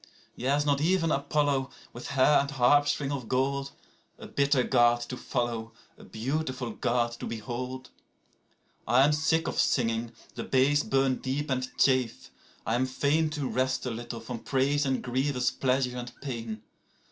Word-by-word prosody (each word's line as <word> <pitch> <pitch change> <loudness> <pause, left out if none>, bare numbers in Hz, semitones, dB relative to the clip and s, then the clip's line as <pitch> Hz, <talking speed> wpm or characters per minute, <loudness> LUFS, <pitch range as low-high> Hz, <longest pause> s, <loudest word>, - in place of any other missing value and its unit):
7Yea, 135 +4 +1
is 145 - 0
not 145 -1 +2
even 165 0 +2
Apollo, 140 -2 +1 0.2
with 120 - -8
hair 140 +2 +4
and 140 - -1
harpstring 145 +1 +2
of 130 -5 -4
gold,8A 140 +2 -4
bitter 140 -2 +3
God 120 -2 +4
to 120 +2 -5
follow, 120 -3 -3 0.2
a - - -15
beautiful 130 +1 -3
God 120 +2 0
to - - -5
behold?9I 125 +2 -4
am 150 - +3
sick 155 +2 +1
of - - -2
singing; 115 -2 +1 0.2
the - - -5
bays 140 +3 +3
burn 135 -2 +1
deep 140 +2 -3
and 130 0 -1
chafe: 130 -4 +1 0.3
I 110 - 0
am 125 +2 +1
fain10To 145 +2 0
rest 130 +1 0
a 125 - -2
little 120 0 -6
from 115 +1 -6
praise 140 +3 +1
and 130 -1 -1
grievous 130 0 0
pleasure 130 -1 0
and 120 0 -7
pain. 115 -5 -5
130 Hz, 150 wpm, -28 LUFS, 120-140 Hz, 0.3 s, hair